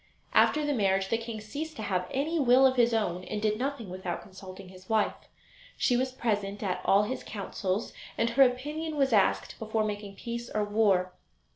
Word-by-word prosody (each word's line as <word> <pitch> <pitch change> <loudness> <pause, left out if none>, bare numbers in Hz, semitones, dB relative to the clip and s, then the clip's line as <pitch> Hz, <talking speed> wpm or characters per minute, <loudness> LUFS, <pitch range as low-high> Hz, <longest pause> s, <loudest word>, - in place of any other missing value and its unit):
After 300 0 +4
the 290 - +1
marriage 195 -4 +1
the 230 - +2
king 230 -1 -6
ceased 295 +9 -6
to 220 - -6
have 180 -3 -1
any 315 +5 -1
will 260 -1 +6
of 260 0 +4
his 240 -1 +4
own 185 -6 -1
and 210 - -3
did 215 0 0
nothing 265 -4 -3
without 185 -1 -5
consulting 190 0 -11
his 185 0 -15
wife. 220 -2 +2 0.6
She 245 - +2
was 255 +1 0
present 205 -5 -2
at 185 -3 -2
all 200 +1 +4
his 255 +5 -4
councils, 200 0 -3 0.2
and 230 0 +1
her 265 +4 +3
opinion 295 +5 +1
was 270 -4 +2
asked 200 -3 +2
before 220 0 -1
making 205 -1 -4
peace 235 +2 -6
or 215 - 0
war. 205 -4 +2
220 Hz, 190 wpm, -29 LUFS, 195-255 Hz, 0.6 s, will